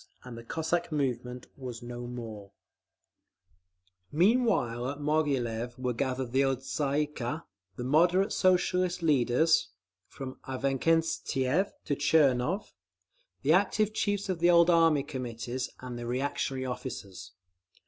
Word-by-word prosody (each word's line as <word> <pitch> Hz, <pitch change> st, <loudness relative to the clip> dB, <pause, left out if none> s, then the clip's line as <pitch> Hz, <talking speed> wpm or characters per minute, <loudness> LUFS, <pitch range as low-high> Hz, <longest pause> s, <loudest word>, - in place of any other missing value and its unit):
And 125 Hz, -2 st, -9 dB
the 115 Hz, -, -9 dB
Cossack 160 Hz, +7 st, -2 dB
movement 125 Hz, -4 st, -2 dB
was 125 Hz, -3 st, -7 dB
no 120 Hz, 0 st, -6 dB
more…. 110 Hz, -5 st, -8 dB, 1.6 s
Meanwhile 170 Hz, -, +2 dB
at 145 Hz, +1 st, -6 dB
Moghilev 130 Hz, -6 st, -1 dB
were 125 Hz, -1 st, -1 dB
gathered 130 Hz, 0 st, -2 dB
the 135 Hz, +2 st, +3 dB
old 135 Hz, -1 st, 0 dB
Tsay 145 Hz, +1 st, 0 dB
ee -, -, -1 dB
kah 150 Hz, +1 st, -5 dB, 0.3 s
the 120 Hz, -, -5 dB
"moderate" 175 Hz, +8 st, +3 dB
Socialist 180 Hz, -1 st, +2 dB
leaders—from 135 Hz, -1 st, 0 dB
Avksentiev 140 Hz, +4 st, 0 dB
to 145 Hz, -, 0 dB
Tchernov—the 155 Hz, -, 0 dB
active 215 Hz, -1 st, +2 dB
chiefs 205 Hz, -2 st, -1 dB
of 185 Hz, -3 st, -2 dB
the 175 Hz, +1 st, +4 dB
old 170 Hz, 0 st, +6 dB
Army 165 Hz, -4 st, +4 dB
Committees, 125 Hz, -2 st, -4 dB
and 125 Hz, -1 st, -6 dB
the 120 Hz, -, -5 dB
reactionary 130 Hz, +1 st, -2 dB
officers. 120 Hz, -7 st, -6 dB
135 Hz, 120 wpm, -29 LUFS, 125-165 Hz, 1.6 s, old